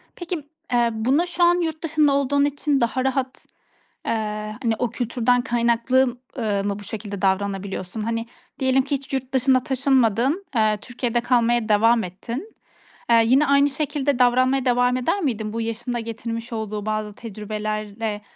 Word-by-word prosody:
Peki, 345 -3 -5 0.3
eee, 240 -1 +3
buna 255 +10 +2
şu 350 0 -1
an 350 0 +4
yurt 320 -1 -3
dışında 305 -2 +3
olduğun 280 +1 +2
için 290 -1 0
daha 250 +2 0
rahat, 265 -1 -2 0.6
eee, - - +1 0.5
hani, 225 -2 +2
o 245 - 0
kültürden 245 0 +1
kaynaklı 240 +2 +2
m 245 - -2 0.3
ııı, 205 -4 0
mı 200 0 -2
bu 205 - -10
şekilde 205 -1 -6
davranabiliyorsun? 195 0 -1
Hani, 230 +1 -2 0.3
diyelim 265 0 +3
ki 280 +1 -2
hiç 275 0 -5
yurt 260 0 -3
dışına 260 0 +3
taşınmadın, 265 - +2
eee, 215 -1 +3
Türkiye'de 240 -1 -2
kalmaya 240 -2 +2
devam 225 +2 +4
ettin. 235 - -7 0.6
Eee, 230 -1 +6
yine 270 +6 +4
aynı 280 +1 +4
şekilde 285 -1 -1
davranmaya 255 +1 +3
devam 245 0 +3
eder 255 +11 0
miydin? 220 - -2
Bu 230 - -3
yaşın 230 +2 -3
da 240 - -1
getirmiş 230 +1 -5
olduğu 215 -2 -4
bazı 215 -1 -2
tecrübelerle 215 0 -4
240 Hz, 160 wpm, -23 LUFS, 220-270 Hz, 0.6 s, Eee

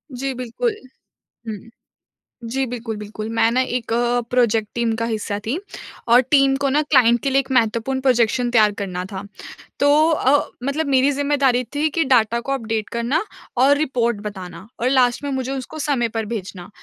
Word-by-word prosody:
जी, 270 +1 -3
बिल्कुल। 255 - -2 0.7
हुँ। 215 +1 -8 0.8
जी, 270 0 0
बिल्कुल, 235 -2 -5
बिल्कुल। 210 +1 -7
मैं 225 - +4
ना 255 - +2 0.2
एक 230 -1 -7 0.4
प्रोजेक्ट 230 -4 +2
टीम 235 -1 0
का 230 - -2
हिस्सा 215 -3 -3
थी 275 +9 -1 0.5
और 240 +2 +7
टीम 275 -2 +5
को 275 - +2
ना 290 +3 +2
क्लाइंट 240 -5 +4
के 275 - 0
लिए 270 - +3
एक 265 - -8
महत्वपूर्ण 235 +2 +1
प्रोजेक्शन 245 -1 +2
तैयार 215 -3 +4
करना 180 -2 -4
था। 190 - -5 0.6
तो 285 - +4 0.2
अ, 290 -2 +2 0.2
मतलब 290 +3 -1
मेरी 270 0 +3
ज़िम्मेदारी 275 -3 +1
थी 300 +2 +1
कि 325 +1 0
डाटा 235 -3 +3
को 275 - -4
अपडेट 225 -4 -2
करना 235 +5 0 0.4
और 280 +3 +5
रिपोर्ट 245 -6 0
बताना 190 -2 -8
और 245 - +2
लास्ट 250 -2 +2
में 285 - -2
मुझे 265 0 -2
उसको 270 +3 -6
समय 275 -6 0
पर 225 -1 -1
भेजना। 190 -5 -6
245 Hz, 175 wpm, -21 LUFS, 225-275 Hz, 0.8 s, और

